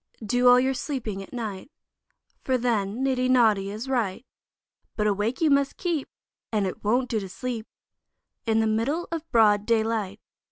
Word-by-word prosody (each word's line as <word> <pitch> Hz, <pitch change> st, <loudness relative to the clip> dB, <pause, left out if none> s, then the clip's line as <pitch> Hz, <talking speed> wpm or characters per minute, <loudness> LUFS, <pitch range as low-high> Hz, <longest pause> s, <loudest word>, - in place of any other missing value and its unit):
DO 245 Hz, +3 st, +2 dB
all 245 Hz, 0 st, +8 dB
your 260 Hz, +1 st, +1 dB
sleeping 245 Hz, -7 st, -4 dB
at 195 Hz, -, -11 dB
night, 220 Hz, -3 st, -5 dB, 0.7 s
For 260 Hz, -1 st, +1 dB
then 230 Hz, -1 st, -1 dB
niddy 255 Hz, -1 st, +1 dB
noddy 220 Hz, -6 st, +4 dB
is 215 Hz, +5 st, -6 dB
right; 235 Hz, -3 st, -1 dB, 0.7 s
But 210 Hz, -, 0 dB
awake 210 Hz, +6 st, 0 dB
you 315 Hz, -2 st, +4 dB
must 280 Hz, 0 st, +2 dB
keep, 335 Hz, -6 st, -2 dB, 0.4 s
And 210 Hz, -3 st, +1 dB
it 185 Hz, -, -5 dB
won't 245 Hz, +5 st, +2 dB
do 225 Hz, -, -1 dB
to 195 Hz, -2 st, -7 dB
sleep, 235 Hz, +1 st, -5 dB, 0.8 s
In 225 Hz, 0 st, +3 dB
the -, -, +2 dB
middle 230 Hz, +10 st, 0 dB
of 330 Hz, -1 st, -5 dB
broad 210 Hz, -3 st, +4 dB
daylight. 220 Hz, -3 st, 0 dB
230 Hz, 165 wpm, -25 LUFS, 210-255 Hz, 0.8 s, all